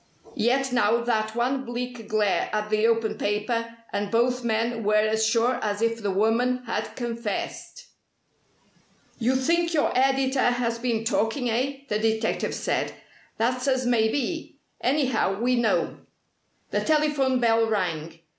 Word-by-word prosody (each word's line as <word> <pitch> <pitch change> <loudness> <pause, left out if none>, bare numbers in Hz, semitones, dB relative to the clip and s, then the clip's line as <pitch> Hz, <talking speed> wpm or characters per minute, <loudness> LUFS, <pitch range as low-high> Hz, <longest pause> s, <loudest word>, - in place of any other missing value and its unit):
Yet 265 +4 +1
now 235 -1 +3
that 220 -2 0
one 260 +3 0
bleak 245 -2 -6
glare 210 -2 +1
at 210 0 -2
the 215 +1 +3
open 230 -1 0
paper, 230 +3 -1 0.2
and 205 0 -1
both 245 +2 +1
men 230 0 0
were 210 +1 +2
as 215 +1 +2
sure 230 +3 +2
as 205 -1 -1
if 230 0 0
the 205 - -1
woman 230 +6 +1
had 230 - -3
confessed. 235 - -5 1.3
"You 250 +2 +2
think 335 +5 +1
your 295 - +2
editor 265 +1 +2
has 235 -1 -1
been 230 -2 -1
talking, 225 +2 0
eh?" 270 +4 -1
the 210 -2 -1
detective 220 0 0
said. - - -1 0.4
"That's 250 +3 0
as 260 -1 +1
may 230 -3 +3
be. 320 +4 -3 0.3
Anyhow, 255 -8 +1
we 250 +2 +2
know." 235 -2 +1 0.7
The - - +1
telephone 295 -4 +2
bell 230 -1 +3
rang. 165 -5 -2
235 Hz, 145 wpm, -25 LUFS, 220-255 Hz, 1.3 s, now